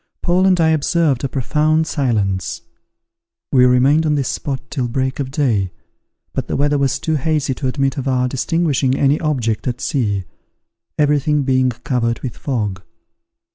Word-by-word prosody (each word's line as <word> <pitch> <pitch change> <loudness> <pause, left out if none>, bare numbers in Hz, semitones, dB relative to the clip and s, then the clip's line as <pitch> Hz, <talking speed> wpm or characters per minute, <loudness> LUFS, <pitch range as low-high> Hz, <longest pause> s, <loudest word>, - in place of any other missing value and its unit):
Paul 185 +2 +3
and 185 -2 +3
I 160 -1 +4
observed 155 -3 +1
a 135 - -1
profound 155 +5 +1
silence. 105 - -1 0.9
We 125 -2 +5
remained 135 +5 +4
on 150 - +2
this 140 -3 -1
spot 135 -2 -3
till 130 -4 -1
break 130 +3 -2
of 135 -2 -2
day, 120 - 0 0.6
but - - -3
the - - -2
weather 145 +1 +1
was 140 0 +1
too 160 +1 -1
hazy 150 -1 0
to 130 +1 -3
admit 135 +1 -1
of 135 - -4
our 125 -1 +1
distinguishing 140 -1 0
any 140 +2 +2
object 125 -8 -1
at 125 0 -2
sea, 105 -8 -1 0.7
every 150 -1 +3
thing 150 +1 +1
being 130 -1 +2
covered 120 -1 -2
with 125 -4 -5
fog. 105 -8 -3
135 Hz, 165 wpm, -18 LUFS, 125-150 Hz, 0.9 s, We